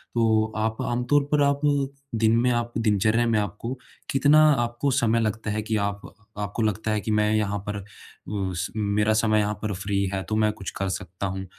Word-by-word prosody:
तो 110 -1 +2
आप 110 +1 -1
आमतौर 125 +4 +1
पर 150 -1 +3
आप, 140 0 +1 0.5
दिन 110 0 +3
में 125 +1 +2
आप, 120 0 -1
दिनचर्या 110 +1 +2
में 110 -2 +2
आपको 105 +5 -4 0.4
कितना 145 +3 +5 0.2
आपको 120 +4 -1
समय 115 -4 +2
लगता 110 -1 -2
है 110 0 -1
कि 110 +1 -2
आप 100 0 -2 0.4
आपको 105 +2 -3
लगता 110 +1 -1
है 105 - +1
कि 110 - -3
मैं 105 0 +2
यहाँ 105 -1 0
पर 100 -1 -4 0.7
उस 85 0 -3
मेरा 105 0 +1
समय 110 -1 +3
यहाँ 105 0 0
पर 105 -2 -2
फ़्री 100 +1 -1
है 95 - -1
तो 110 - 0
मैं 110 -1 +3
कुछ 95 - -6
कर 95 -1 -1
सकता 95 +1 -5
हूँ? 95 0 -4
110 Hz, 195 wpm, -25 LUFS, 100-115 Hz, 0.7 s, कितना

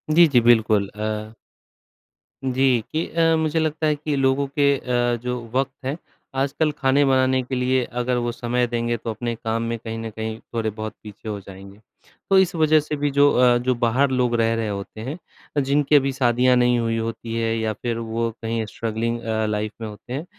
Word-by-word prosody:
जी, 170 -1 +8
जी 120 - +7
बिल्कुल। 110 -4 +4
अ 110 +1 -4 1.1
जी, 130 -3 +2
कि 160 +2 0
अ, 165 0 +2
मुझे 160 0 0
लगता 155 0 0
है 150 - +2
कि 150 0 -3
लोगों 135 +1 +2
के 140 0 +2
अ, 120 -1 0
जो 125 0 -3
वक़्त 135 0 +1
हैं 140 +5 -2 0.4
आजकल 145 +3 +1
खाने 140 +1 +3
बनाने 130 -1 +3
के 130 +1 -4
लिए 125 0 +1
अगर 125 +1 -2
वो 120 0 -1
समय 120 +1 -1
देंगे, 120 0 -1
तो 115 - -6
अपने 115 +2 -3
काम 115 0 -2
में 115 0 -2
कहीं 115 0 -6
न 115 0 -5
कहीं 110 +1 -5
थोड़े-बहुत 110 -1 -3
पीछे 105 +1 -9
हो 105 -1 -3
जाएँगे। 95 +1 -12 0.5
तो 195 - +5
इस 190 -1 +2
वजह 155 -1 +4
से 150 0 -3
भी 145 0 -1
जो 145 +1 +5
अ, 125 -1 +5
जो 125 +1 0
बाहर 120 +3 +2
लोग 125 -2 +1
रह 115 0 +2
रहे 115 -1 -1
होते 100 +1 -6
हैं, 140 +8 -5 0.5
जिनकी 145 +2 +2
अभी 135 -1 +4
शादियाँ 125 0 +3
नहीं 125 -1 +3
हुई 115 0 0
होती 115 0 -4
हैं 115 0 0
या 110 -1 -1
फ़िर 115 +2 -3
वो 115 0 -2
कहीं 115 0 -2
स्ट्रगलिंग 115 +2 -3
अ, 110 -1 -1
लाइफ़ 105 0 -2
में 110 - -3
होते 105 +4 -9
हैं। 150 +6 -4
120 Hz, 200 wpm, -22 LUFS, 115-135 Hz, 1.1 s, जी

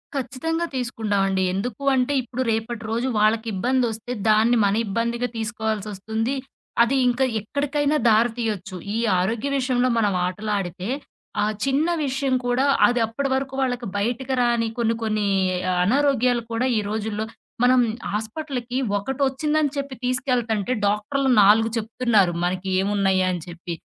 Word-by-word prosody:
ఖచ్చితంగా 280 +6 -2
తీసుకుంటామండి. 205 -6 0
ఎందుకు 215 +6 -4
అంటే, 255 +2 +1
ఇప్పుడు 250 +1 -5
రేపటి 225 +1 -3
రోజు 235 +3 0
వాళ్ళకి 220 +2 +2
ఇబ్బందొస్తే, 240 +2 -1 0.2
దాన్ని 220 +3 +4
మన 200 0 +2
ఇబ్బందిగా 235 +4 -1
తీసుకోవాల్సొస్తుంది. 220 +1 -2 0.5
అది 245 +4 +1
ఇంకా 245 +2 +2 0.2
ఎక్కడికైనా 285 +6 0
దారితీయొచ్చు. 220 -4 0 0.2
ఈ - - 0 0.2
ఆరోగ్య 225 +9 -1
విషయంలో 255 -1 +1
మనం 210 -3 +2
ఆటలాడితే, 195 -1 -3 0.5
ఆ - - +3 0.2
చిన్న 275 +4 +1 0.2
విషయం 265 0 -1
కూడా 245 +2 +2 0.2
అదప్పటి 245 +3 0
వరకు 270 0 -3
వాళ్ళకి 245 -2 -1
బయటకి 245 +5 -1
రాని 235 -1 +2
కొన్ని 230 -1 +1
కొన్ని 215 -2 0 0.6
అనారోగ్యాలు 250 0 +2
కూడా 230 +2 0
ఈ - - 0
రోజుల్లో 215 0 -2 0.4
మనం 255 +1 +5 0.3
హాస్పిటల్‌కి 245 +3 -4 0.2
ఒకటొచ్చిందని 275 +6 0
చెప్పి 275 -1 -4
తీసుకెళ్తంటే 250 -4 0
డాక్టర్లు 215 +7 0
4 215 +3 +5
చెప్తున్నారు 225 -4 +2
మనకి 185 +2 -1
ఏమున్నయ 195 -1 +1
అని 175 -2 -3
చెప్పి. 175 0 -7
230 Hz, 125 wpm, -23 LUFS, 210-255 Hz, 0.6 s, మనం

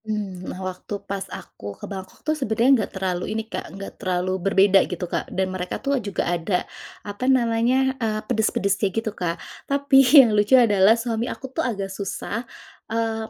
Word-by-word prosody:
Mmm, 200 -4 -4
nah - - -6
waktu 185 +2 -6
pas 195 -1 -5
aku 100 0 -9
ke - - -8
Bangkok 190 +4 -9
tuh 310 - +2
sebenarnya 240 -4 +1
enggak 230 -6 +1
terlalu 185 -2 -2
ini 220 - -3
Kak, 220 - -6
enggak 195 +1 -9
terlalu 185 0 -1
berbeda 195 0 +5
gitu 180 0 -3
Kak, 175 - -3
dan 190 0 -2
mereka 180 -1 -3
tuh 275 -1 -1
juga 200 -3 -2
ada, 175 +2 -1 0.4
apa 205 +6 -2
namanya, 255 +1 +2
eee, 215 -1 0
pedes-pedes 200 -2 0
kayak 195 -3 +1
gitu 225 -1 -1
Kak. 170 -4 -3 0.3
Tapi 280 -1 +5 0.2
yang 240 -6 +8
lucu 210 +5 +5
adalah, 210 -2 +5
suami 230 +1 -2
aku 265 -1 -7
tuh - - -1
agak 200 -6 -3
susah, 200 +3 -4 0.5
eee, 225 -1 -2
210 Hz, 180 wpm, -23 LUFS, 190-230 Hz, 0.5 s, yang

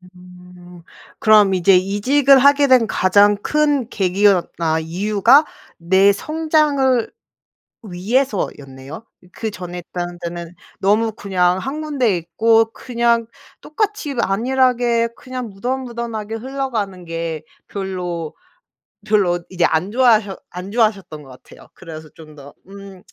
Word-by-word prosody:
음. 180 -1 -15 0.4
그럼 210 -3 +5
이제 185 +1 +4
이직을 255 +9 +3
하게 280 +1 +4
된 250 -4 +4
가장 205 +2 +3
큰 290 0 0
계기였 195 -2 +1
아 160 -1 0
이유가 210 - +3 0.3
내 190 +4 +3
성장을 295 -2 0 0.7
위해서였네요. 180 - -3 0.3
그전에 180 -5 -6
했다는 175 0 -6
데는 170 0 -7 0.2
너무 215 +3 +1
그냥 185 -4 0
1 280 +8 -5
군데 260 -11 0
있고 225 +7 +1
그냥 235 -2 0 0.3
똑같이 400 - -3
안일하게 240 +2 +1
그냥 255 -2 -7
무던 250 +7 -4
무던하게 230 -3 -6
흘러가는 225 -8 -4
게 165 -2 -5 0.2
별로 180 -5 -5 0.7
별로 190 -5 +1
이제 180 -2 -1
안 165 +5 0
좋아하셔 220 -5 +2
안 180 +2 -8
좋아하셨던 205 -9 -1
것 - - -16
같아요. - - -17
그래서 155 -1 -11
좀 155 -2 -15
더 140 0 -13
음 195 -1 -12
205 Hz, 250 characters per minute, -19 LUFS, 180-245 Hz, 0.7 s, 그럼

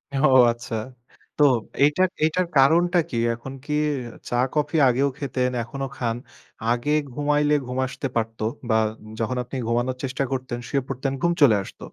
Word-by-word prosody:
ও 140 +3 +4 0.2
আচ্ছা। 120 -1 -6 0.6
তো 150 - +4 0.4
এটার 180 +5 +3 0.2
এটার 175 +3 +1
কারণটা 170 +6 +5
কী? 120 - -3 0.2
এখন 125 +3 -8
কি 150 - -3 0.6
চা 120 - -1 0.2
কফি 150 +1 0
আগেও 135 +3 +2
খেতেন, 130 -3 -1
এখনও 135 +3 -5
খান। 115 -2 -1 0.6
আগে 120 +5 0 0.2
ঘুমাইলে 150 +1 +2
ঘুম 125 +1 -5
আসতে 135 +1 -4
পারত 115 0 -2 0.3
বা 110 - +3 0.4
যখন 125 +3 -1
আপনি 125 +3 -9
ঘুমানোর 120 +2 0
চেষ্টা 135 +1 -1
করতেন, 130 -2 -3
শুয়ে 140 -1 0
পড়তেন 135 +1 -2
ঘুম 170 - +3
চলে 120 -7 +7
আসত। - - -13
135 Hz, 155 wpm, -24 LUFS, 120-150 Hz, 0.6 s, চলে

